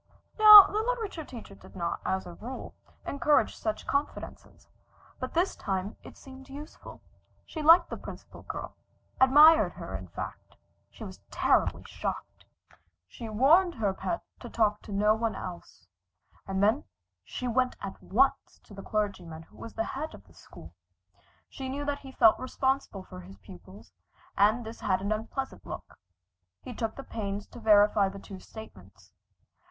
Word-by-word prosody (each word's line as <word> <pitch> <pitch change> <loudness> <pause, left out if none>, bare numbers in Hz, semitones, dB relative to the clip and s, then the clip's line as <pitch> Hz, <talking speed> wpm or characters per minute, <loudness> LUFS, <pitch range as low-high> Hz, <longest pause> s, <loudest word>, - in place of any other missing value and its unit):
Now 425 -2 +12
the 425 - -1
literature 445 -8 -3
teacher 235 -7 -11
did 195 - -16
not, 170 -2 -3
as 190 0 -2
a 175 - -9
rule, 245 +9 -8 0.3
encourage 290 +1 +2
such 215 -1 -4
confidences, 280 +1 -4 0.5
but 255 +3 -6
this 350 +3 +1
time 195 +1 -3
it - - -13
seemed 265 0 -13
useful. 290 +3 -11 0.4
She 315 - -6
liked 335 +3 +6
the - - -4
Principal - - -11
Girl - - -7 0.5
admired 280 - +7
her, 95 - -8
in 95 -1 -7
fact. 85 - -8 0.3
She - - -12
was - - -10
terribly - - +1
shocked. - - -6 0.6
She 230 - -9
warned 320 - +4
her 205 -4 0
pet 340 - -4 0.2
to - - -9
talk 210 -2 +1
to - - -11
no 210 +2 +3
one 225 0 -2
else, 175 - -9 0.6
and 195 0 -1
then 215 +2 +2 0.4
she 250 - -5
went 250 +1 +1
at 195 - -8
once 270 +6 +1
to - - -16
the 195 - -9
clergyman 190 -7 -3
who - - -21
was 230 - -9
at - - -33
the 225 - 0
head 300 +7 -5
of 100 - -16
the 85 - -22
school. 80 +1 -14 0.7
She 265 -1 -7
knew 285 +2 -4
that 285 0 -2
he 270 - -11
felt 225 -4 +5
responsible 260 -5 -2
for 90 - -11
his 95 +2 -13
pupils, 95 +1 -15 0.4
and 215 +4 +3
this 225 +1 -9
had 185 - 0
an 200 +2 -3
unpleasant 225 +5 -4
look. - - -9 0.7
He 250 - -7
took 225 -1 -3
the 275 - -8
pains 205 -4 -5
to 240 - -11
verify 205 -2 +4
the 195 - -9
two 195 -1 -10
statements. 95 - -14
220 Hz, 165 wpm, -28 LUFS, 190-270 Hz, 0.7 s, Now